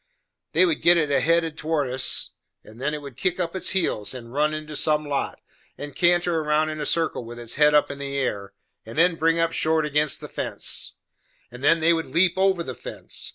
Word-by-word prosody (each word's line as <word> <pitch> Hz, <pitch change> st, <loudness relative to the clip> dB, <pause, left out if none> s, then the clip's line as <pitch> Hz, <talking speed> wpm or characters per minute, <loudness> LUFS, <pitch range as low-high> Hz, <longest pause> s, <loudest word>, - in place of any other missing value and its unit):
They -, -, +6 dB
would 330 Hz, -4 st, 0 dB
git 175 Hz, 0 st, +6 dB
it 150 Hz, -3 st, 0 dB
headed 165 Hz, -1 st, +1 dB
towards 150 Hz, -5 st, -1 dB
us, 130 Hz, -, 0 dB, 0.3 s
and 110 Hz, +3 st, -14 dB
then 150 Hz, +2 st, -1 dB
it 150 Hz, -, -8 dB
would 140 Hz, -3 st, -9 dB
kick 185 Hz, -1 st, -1 dB
up 170 Hz, 0 st, -2 dB
its 190 Hz, -, -1 dB
heels, 150 Hz, -, 0 dB
and 120 Hz, -1 st, -10 dB
run 150 Hz, +2 st, +1 dB
into 155 Hz, 0 st, -6 dB
some 150 Hz, +1 st, +2 dB
lot, 140 Hz, -1 st, -2 dB, 0.4 s
and 145 Hz, -1 st, -8 dB
canter 175 Hz, -1 st, +2 dB
round 155 Hz, +1 st, +1 dB
in 155 Hz, 0 st, -5 dB
a 150 Hz, -, -1 dB
circle 165 Hz, -6 st, 0 dB
with 120 Hz, +1 st, -9 dB
its 120 Hz, -1 st, -6 dB
head 150 Hz, +1 st, +4 dB
up 150 Hz, -, +3 dB
in 140 Hz, -, -8 dB
the 140 Hz, 0 st, -4 dB
air, 100 Hz, -7 st, -3 dB, 0.3 s
and 115 Hz, +4 st, -10 dB
then 175 Hz, +2 st, +4 dB
bring 165 Hz, +1 st, +2 dB
up 165 Hz, 0 st, +1 dB
short 160 Hz, -1 st, +1 dB
ag'inst 150 Hz, -1 st, +1 dB
the -, -, -8 dB
fence; -, -, -3 dB, 0.6 s
and 125 Hz, +2 st, -11 dB
then 165 Hz, +3 st, +4 dB
they 165 Hz, +2 st, +4 dB
would 165 Hz, -1 st, -2 dB
leap 175 Hz, 0 st, +3 dB
over 190 Hz, -2 st, +2 dB
the 130 Hz, -, -6 dB
fence. -, -, -6 dB
155 Hz, 220 wpm, -24 LUFS, 140-165 Hz, 0.6 s, They